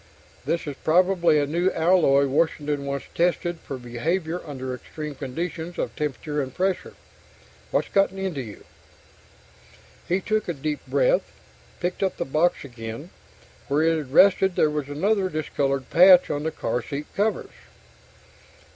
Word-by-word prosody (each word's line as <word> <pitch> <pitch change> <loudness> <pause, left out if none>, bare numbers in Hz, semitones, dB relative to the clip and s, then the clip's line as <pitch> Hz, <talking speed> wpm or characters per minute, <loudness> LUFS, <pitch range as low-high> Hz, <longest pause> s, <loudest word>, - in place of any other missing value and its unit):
This 170 - -1
is 145 -2 -5
probably 175 -1 +3
a 145 - +2
new 170 +6 +1
alloy 160 -5 +4
Washington 145 0 0
wants 140 0 -3
tested 175 0 0
for 135 - -7
behavior 160 +9 -2
under 130 -3 -5
extreme 150 +4 -7
conditions 160 +5 -5
of - - -3
temperature 150 0 -2
and 130 -1 -5
pressure. 185 +6 -2 0.7
What's - - 0
gotten 195 -1 +2
into 190 -7 -3
you?_ 110 -5 -10 1.4
He 180 +2 +1
took 215 +2 -1
a - - 0
deep 150 +2 -3
breath, - - +2 0.5
picked 175 0 -3
up 190 -1 0
the - - -2
box 155 +3 +1
again. 120 +5 -8 0.6
Where 145 +3 +2
it 165 0 +3
had 150 -5 -5
rested 190 +3 +5
there 155 - +3
was 150 -2 -3
another 190 +6 +1
discolored 140 -4 -2
patch 180 +1 +7
on 145 - -2
the 160 +1 -2
car 120 -3 -2
seat 140 +5 -5
covers. 215 +2 -1
155 Hz, 145 wpm, -24 LUFS, 140-180 Hz, 1.4 s, patch